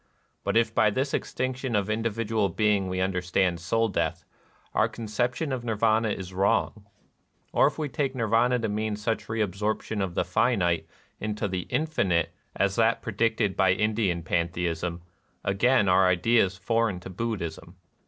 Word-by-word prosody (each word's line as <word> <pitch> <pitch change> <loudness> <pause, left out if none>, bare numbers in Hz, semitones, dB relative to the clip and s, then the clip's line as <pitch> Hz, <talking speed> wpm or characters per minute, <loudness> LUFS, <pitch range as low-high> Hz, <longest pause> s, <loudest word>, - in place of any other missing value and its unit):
But - - +1
if 115 -1 +2
by 110 - +4
this 135 +6 -1
extinction 130 -1 -2
of 100 -1 +1
individual 110 -1 0
being 100 0 +1
we 95 0 -2
understand 90 -1 0
soul 115 +7 +1
death, 100 - -2 0.5
our - - +2
conception 120 +6 -2
of 130 -2 -2
Nir 115 -2 -1
212 110 +1 +3
NIRVANA 110 - 0
vana - - -9
is 95 -1 -7
wrong. 100 +2 +1 0.7
Or - - +5
if - - -3
we 155 -2 -1
take 140 -2 -2
Nirvana 115 +1 +2
to 115 -2 -1
mean 105 0 -1
such 105 +2 -2
reabsorption 105 0 -1
of 90 -3 -4
the - - +1
finite 90 -5 +1 0.3
into 105 0 -2
the 90 -2 -4
infinite 100 - 0 0.2
as 100 0 +1
that 115 0 +2
predicted 110 -2 0
by 95 -1 +4
Indian 105 -4 0
panthe 85 +1 -1
ism, 85 +1 -3 0.4
again 105 +3 +3
our 95 +1 +5
idea 100 +6 +4
is 95 0 -7
foreign 110 -1 0
to 95 - -8
Buddhism. 90 -5 -4
105 Hz, 165 wpm, -27 LUFS, 95-115 Hz, 0.7 s, Or